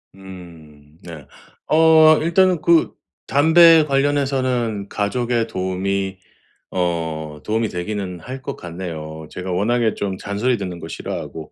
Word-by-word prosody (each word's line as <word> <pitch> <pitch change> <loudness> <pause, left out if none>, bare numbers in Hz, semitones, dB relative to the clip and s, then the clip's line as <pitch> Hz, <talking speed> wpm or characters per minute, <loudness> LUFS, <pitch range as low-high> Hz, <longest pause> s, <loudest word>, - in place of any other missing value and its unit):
음 80 -6 -14
네. 80 -5 -10 0.4
어 160 0 +6
일단은 175 +1 +2
그 170 0 +3 0.3
담배 160 +2 +6
관련해서는 130 -7 0
가족의 115 +2 -1
도움이 95 0 -3 0.5
어 80 -4 -3
도움이 110 0 -1
되기는 90 0 -5
할 130 +7 -8
것 - - -6
같네요. 80 -3 -7
제가 90 0 -6
워낙에 110 +4 +1
좀 95 -2 -3
잔소리 110 +6 -1
듣는 90 -3 -6
거 80 - -8
싫어하고 80 0 -7
100 Hz, 250 characters per minute, -20 LUFS, 90-130 Hz, 0.5 s, 어